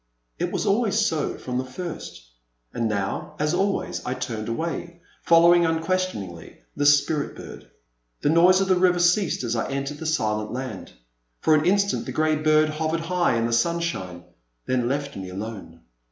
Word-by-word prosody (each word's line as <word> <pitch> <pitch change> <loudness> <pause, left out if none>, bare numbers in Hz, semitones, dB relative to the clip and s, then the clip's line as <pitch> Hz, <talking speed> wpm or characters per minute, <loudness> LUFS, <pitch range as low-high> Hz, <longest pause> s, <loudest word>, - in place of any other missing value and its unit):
It - - -1
was - - -2
always 210 0 +2
so 200 -9 0
from 125 -1 -3
the - - -1
first, 130 - -7 0.5
and 115 -1 -1
now, 100 -2 -3
as 150 +1 0
always, 195 +2 -1
I 125 - -3
turned 115 -3 -4
away, 170 +6 -4 0.2
following 170 +1 +6
un 160 -1 +1
questioningly 165 - -3
the 145 - +2
Spirit 145 0 +2
bird. - - -11 0.5
The - - +2
noise 180 +4 +5
of 195 - 0
the 185 -1 +3
river 180 -1 +4
ceased 175 -2 +2
as 120 -1 -1
I 115 - -2
entered 140 +2 -4
the 160 - -4
Silent 110 -8 -1
Land. 130 +1 -6 0.5
For 160 - +4
an 155 0 +3
instant 200 +1 +1
the - - -3
grey 155 0 +2
bird 155 0 +3
hovered 160 +2 -2
high 175 -4 +1
in 115 0 +1
the 115 - -1
sun 170 +9 +2
shine, 95 - -4 0.4
then 125 -2 0
left 140 +1 -3
me 95 -1 -6
alone. 95 -3 -7
155 Hz, 180 wpm, -24 LUFS, 120-175 Hz, 0.5 s, following